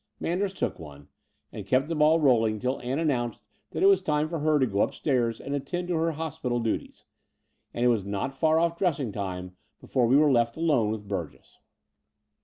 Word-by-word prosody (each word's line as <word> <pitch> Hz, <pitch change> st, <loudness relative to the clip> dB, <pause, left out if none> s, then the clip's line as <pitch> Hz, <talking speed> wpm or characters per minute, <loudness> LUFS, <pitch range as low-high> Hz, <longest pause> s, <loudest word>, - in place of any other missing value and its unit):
Manders 190 Hz, +3 st, -1 dB
took 185 Hz, -, -3 dB
one, 75 Hz, -3 st, -12 dB, 0.4 s
and -, -, -7 dB
kept 130 Hz, +2 st, +2 dB
the 165 Hz, -, -2 dB
ball 155 Hz, +1 st, +4 dB
rolling 115 Hz, -7 st, +3 dB
till 125 Hz, +5 st, -2 dB
The -, -, -12 dB
Dower -, -, -4 dB
House 150 Hz, +5 st, 0 dB
219 -, -, +3 dB
Ann 125 Hz, -3 st, 0 dB
announced 120 Hz, -3 st, -6 dB, 0.3 s
that -, -, -3 dB
it -, -, +6 dB
was 395 Hz, 0 st, +5 dB
time 150 Hz, 0 st, 0 dB
for 165 Hz, -1 st, -3 dB
her 155 Hz, 0 st, +2 dB
to 135 Hz, -, +3 dB
go 100 Hz, -4 st, -1 dB
up -, -, 0 dB
stairs 120 Hz, -5 st, 0 dB
and 140 Hz, -, -5 dB
attend 175 Hz, +6 st, -3 dB
to -, -, 0 dB
her 165 Hz, 0 st, 0 dB
hospital 155 Hz, -6 st, -3 dB
duties; 115 Hz, -2 st, -4 dB, 0.7 s
and 120 Hz, -, -1 dB
it -, -, +5 dB
was 115 Hz, -5 st, +1 dB
not 100 Hz, +6 st, -3 dB
far 155 Hz, +3 st, +2 dB
oflE 170 Hz, 0 st, +1 dB
dressing 145 Hz, -, 0 dB
time 90 Hz, -2 st, -5 dB, 0.2 s
before 125 Hz, -2 st, 0 dB
we 130 Hz, +4 st, +5 dB
were 150 Hz, -1 st, +4 dB
left 120 Hz, 0 st, +2 dB
alone 150 Hz, -10 st, +2 dB
with 105 Hz, -1 st, -5 dB
Burgess. 90 Hz, -6 st, -6 dB
135 Hz, 220 wpm, -27 LUFS, 110-160 Hz, 0.7 s, it